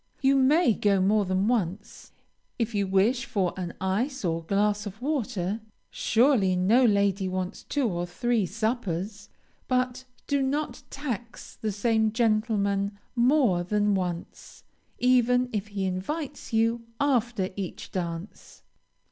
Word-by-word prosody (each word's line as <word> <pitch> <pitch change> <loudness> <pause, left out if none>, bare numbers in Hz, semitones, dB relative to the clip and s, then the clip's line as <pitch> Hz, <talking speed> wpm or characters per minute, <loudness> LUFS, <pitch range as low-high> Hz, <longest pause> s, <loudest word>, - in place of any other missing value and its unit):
You 275 0 +3
may 275 +1 +4
go 200 -2 +2
more 205 +2 +3
than 185 +2 +1
once, 210 -3 -2 0.5
if 230 -1 -1
you 200 -2 0
wish 205 +7 +2
for 195 -8 0
an 180 -2 -5
ice 210 +7 -1
or 165 -1 0
glass 205 +3 +1
of 205 +2 -9
water, 230 - -2 0.3
(surely 225 -6 +3
no 205 +8 +4
lady 200 -3 +2
wants 185 +1 -3
two 285 -4 0
or 175 -3 -2
three 225 +2 0
suppers,) 205 -2 -3 0.4
but 255 0 0 0.2
do 280 -1 +1
not 285 +3 -2
tax 240 -5 -6
the 215 - -3
same 220 +1 +1
gentleman 215 -3 +1 0.2
more 240 -7 +3
than 205 +2 +1
once, 180 -3 -4 0.3
even 250 0 +3
if 210 -1 -2
he 200 -2 -3
invites 280 - -4
you 230 +1 +1 0.2
after 240 -8 +1
each 195 -3 -6
dance. 170 +1 -6
215 Hz, 130 wpm, -27 LUFS, 190-245 Hz, 0.5 s, may